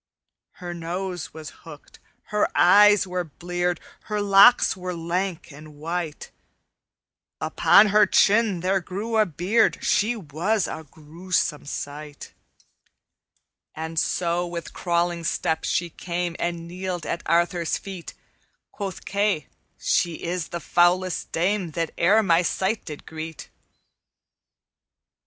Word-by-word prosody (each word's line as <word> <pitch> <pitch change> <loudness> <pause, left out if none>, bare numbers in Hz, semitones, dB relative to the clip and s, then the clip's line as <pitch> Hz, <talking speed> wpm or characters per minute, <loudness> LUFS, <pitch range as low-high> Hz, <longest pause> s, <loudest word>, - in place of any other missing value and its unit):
"Her 175 -1 -7
nose 175 +1 -5
was 155 -1 -9
hooked, 150 -3 -13 0.3
her 210 0 +1
eyes 205 +2 +6
were 180 -1 -2
bleared, 175 +2 -3 0.3
Her 210 0 -2
locks 200 +4 +6
were 180 -1 -5
lank 170 +1 -3
and 150 +1 -13
white; 165 +1 -5 1.1
Upon 210 +1 +5
her 210 0 +5
chin 205 -2 +3
there 190 +2 +1
grew 205 +5 -3
a 215 - +4
beard; 185 +8 +1
She 220 +4 +2
was 190 +3 -1
a 160 - -7
gruesome 160 0 -3
sight. 145 +1 -7 1.4
"And 160 +1 -3
so 175 +1 0
with 170 -1 -7
crawling 175 -1 -1
step 160 0 -1
she 170 -1 -1
came 175 0 -3
And 170 -1 -3
kneeled 180 -1 -5
at 170 - -3
Arthur's 170 0 +1
feet; 190 -4 -9 0.6
Quoth 195 -3 -6
Kay, 200 -6 0 0.3
'She 170 -2 0
is 175 -1 -2
the 170 - -5
foulest 175 +2 +1
dame 185 +2 0
That 165 0 -2
e'er 205 +6 +4
my 170 -3 +4
sight 190 +4 -1
did 150 -3 -8
greet.' 160 0 -8
175 Hz, 120 wpm, -24 LUFS, 165-195 Hz, 1.4 s, eyes